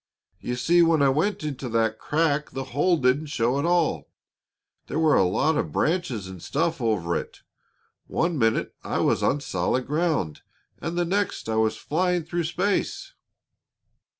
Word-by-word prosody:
You 125 - -3
see, 170 +8 +3
when 165 -3 +4
I 140 - +5
went 155 +8 0
into 140 -4 -4
that 110 -1 0
crack 150 -1 0
the 135 0 -5
hole 170 +6 +3
didn't 135 +3 +1
show 130 -2 0
at 145 - -1
all; 170 - +1 0.8
there - - -3
were 160 -2 +4
a - - +5
lot 145 - +1
of - - -2
branches 155 - 0
and 95 -2 -9
stuff 165 - -1
over 100 -7 0
it. - - -5 0.7
One 170 0 0
minute 115 -1 +1
I - - -2
was - - +2
on 145 - +1
solid 95 +3 -1
ground, 150 - -1 0.4
and 165 +1 -4
the 175 - +2
next 200 - -1
I 110 0 -1
was 110 0 +1
flying 180 +2 0
through 170 +1 -2
space." 185 +5 -1
150 Hz, 165 wpm, -25 LUFS, 115-170 Hz, 0.8 s, I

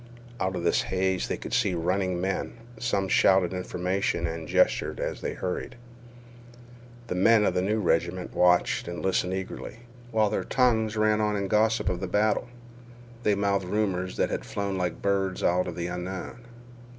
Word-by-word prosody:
Out 95 0 -1
of 90 - -3
this 85 - +3
haze 95 0 0
they - - -2
could - - -7
see 95 -3 +2
running 90 +1 0
men. 95 +2 -2 0.3
Some 100 -5 0
shouted 95 -1 +4
information 90 -1 -1
and 80 -1 -4
gestured - - +2
as - - -3
the - - -3
hurried. 95 +7 -4 1.3
The 115 - -3
men 105 +4 +4
of 95 - +2
the 90 - +1
new 105 +4 0
regiment 90 -1 0
watched 90 -1 +3
and 85 0 -5
listened 95 -1 +1
eagerly, 95 +4 -6 0.3
while 110 -3 +2
their - - -1
tongues 110 -4 +2
ran 110 0 +3
on 105 -1 +1
in 100 -1 -2
gossip 110 +2 +2
of 90 -2 0
the 95 - -3
battle. 105 +4 +1 0.7
They 105 -3 +2
mouthed 100 -1 0
rumors 95 -2 -1
that - - +1
had - - -2
flown 100 -1 -3
like 90 -3 -3
birds 95 -2 0
out 90 +1 +2
of 85 - -5
the 85 0 -3
unknown. 95 +7 -6
95 Hz, 175 wpm, -27 LUFS, 90-105 Hz, 1.3 s, shouted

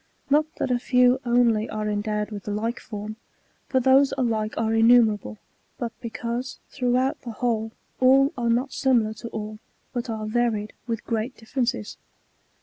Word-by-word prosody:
Not 300 +2 +4
that 255 - -2
a 245 - +2
few 250 +1 +3
only 235 -2 +3
are 215 0 -3
endowed 210 0 -2
with 205 -1 -7
like 225 +4 -2
^otm, 215 0 -7 0.5
for 260 - +2
those 265 +2 +5
alihe 220 -4 0
areinnumerable, 225 - +3 0.4
hut 235 -1 -2
because, 235 +2 -4
through 250 -2 +1
out 260 +1 0
the 245 - -7
whole,^ 225 -2 -1 0.3
all 270 +2 +5
are 240 -2 -1
not 250 +4 +1
similar 235 -5 +2
to 230 +1 -8
all, 215 -1 -6 0.3
but 240 -1 -3
are 220 -1 -3
varied 220 -2 0
with 230 -2 -3
great 225 +1 -2
differences. 225 - -2
235 Hz, 150 wpm, -25 LUFS, 215-250 Hz, 0.5 s, those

